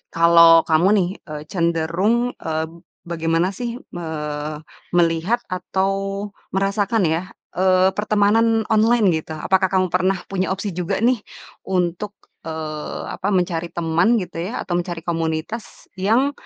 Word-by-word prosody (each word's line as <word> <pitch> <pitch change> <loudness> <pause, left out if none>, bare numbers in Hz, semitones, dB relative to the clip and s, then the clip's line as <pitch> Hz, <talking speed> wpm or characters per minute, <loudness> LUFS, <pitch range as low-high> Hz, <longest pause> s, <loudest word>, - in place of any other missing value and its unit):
kalau 170 0 +7
kamu 160 +4 +4
nih, 185 -3 +2 0.2
eee, 150 0 -6
cenderung, 170 +4 +1 0.3
eee, 160 0 -1 0.4
bagaimana 165 +1 0
sih 240 +1 -3 0.3
me 175 -1 -5 0.9
melihat 170 +7 +2
atau 190 +1 -1 0.6
merasakan 200 +2 +1
ya, 160 +2 +1 0.3
eee, 185 0 +4
pertemanan 215 +2 +3
online 220 0 +4 0.2
gitu, 160 - -8
apakah 190 0 +3
kamu 185 -1 +3
pernah 185 +1 +2
punya 190 -1 0
opsi 200 +2 -4
juga 180 -1 -1
nih, 250 +1 +4 0.5
untuk, 180 +2 -1 0.4
eee, 155 -1 -5
apa, 195 - -4
mencari 175 -2 0
teman 170 +7 +2
gitu 180 - -7
ya 220 - -6
atau 175 - -4
mencari 175 -1 -4
komunitas 165 +6 -4
yang, 235 +9 +3
180 Hz, 130 wpm, -21 LUFS, 165-200 Hz, 0.9 s, kalau